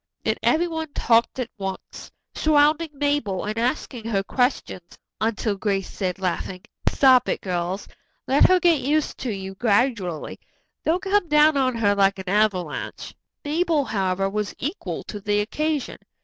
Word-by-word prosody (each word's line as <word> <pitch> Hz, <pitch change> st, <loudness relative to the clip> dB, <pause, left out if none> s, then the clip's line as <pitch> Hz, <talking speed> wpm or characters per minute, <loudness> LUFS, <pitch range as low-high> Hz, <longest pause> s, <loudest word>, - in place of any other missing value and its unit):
Then -, -, +2 dB
everyone 320 Hz, -2 st, 0 dB
talked 230 Hz, +2 st, +2 dB
at 250 Hz, -2 st, -4 dB
once, 190 Hz, -1 st, -6 dB, 0.2 s
surrounding 310 Hz, +1 st, +3 dB
Mabel 280 Hz, -10 st, -1 dB
and 210 Hz, +1 st, -3 dB
asking 245 Hz, -1 st, -2 dB
her 200 Hz, -4 st, 0 dB
questions 245 Hz, -7 st, -2 dB, 0.2 s
until 220 Hz, -1 st, 0 dB
Grace 195 Hz, -1 st, -1 dB
said, 185 Hz, -3 st, -3 dB
laughing: 185 Hz, 0 st, -3 dB, 0.3 s
"Stop 255 Hz, -2 st, +5 dB
it, -, -, 0 dB
girls; 180 Hz, +1 st, -3 dB, 0.4 s
let 275 Hz, +2 st, +5 dB
her 370 Hz, 0 st, +5 dB
get 340 Hz, -3 st, +4 dB
used 295 Hz, +3 st, 0 dB
to 260 Hz, -, -3 dB
you 195 Hz, -1 st, -5 dB
gradually. 205 Hz, -, 0 dB, 0.4 s
Don't 350 Hz, +3 st, 0 dB
come 395 Hz, -1 st, +1 dB
down 300 Hz, 0 st, +5 dB
on 260 Hz, -3 st, +1 dB
her 210 Hz, -3 st, +2 dB
like 195 Hz, -1 st, +3 dB
an 190 Hz, -1 st, -6 dB
avalanche." 195 Hz, -6 st, -1 dB, 0.3 s
Mabel, 315 Hz, -1 st, +1 dB
however, 195 Hz, -3 st, 0 dB
was 210 Hz, +1 st, -3 dB
equal 305 Hz, -, -4 dB
to 210 Hz, -, -7 dB
the 205 Hz, +1 st, 0 dB
occasion. 300 Hz, +7 st, -2 dB
230 Hz, 150 wpm, -23 LUFS, 195-295 Hz, 0.4 s, Stop